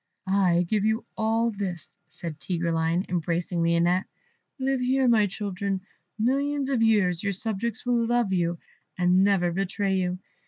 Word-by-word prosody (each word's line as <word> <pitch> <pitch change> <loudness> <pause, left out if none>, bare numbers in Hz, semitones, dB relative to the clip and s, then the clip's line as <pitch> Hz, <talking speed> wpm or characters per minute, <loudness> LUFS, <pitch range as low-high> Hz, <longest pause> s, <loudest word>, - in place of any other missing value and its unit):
"I 185 -3 +2
give 210 +2 +1
you 220 +2 0
all 225 +1 +1
this," 190 -6 -6
said 165 -4 -8
Tigreline, 170 +1 0
embracing 170 0 -1
Lionette; 170 +2 +2 0.5
"live 270 -1 0
here, 260 +1 +2
my 220 -3 +4
children, 200 -1 -3 0.4
millions 275 +4 0
of 255 -4 +1
years; 205 -6 +3
your 200 0 -1
subjects 220 +3 -3
will 240 -1 +2
love 240 -4 +1
you, 170 -1 0 0.4
and 180 +1 +4
never 190 -3 +2
betray 195 +2 -1
you. 180 -1 -1
195 Hz, 145 wpm, -26 LUFS, 175-225 Hz, 0.5 s, my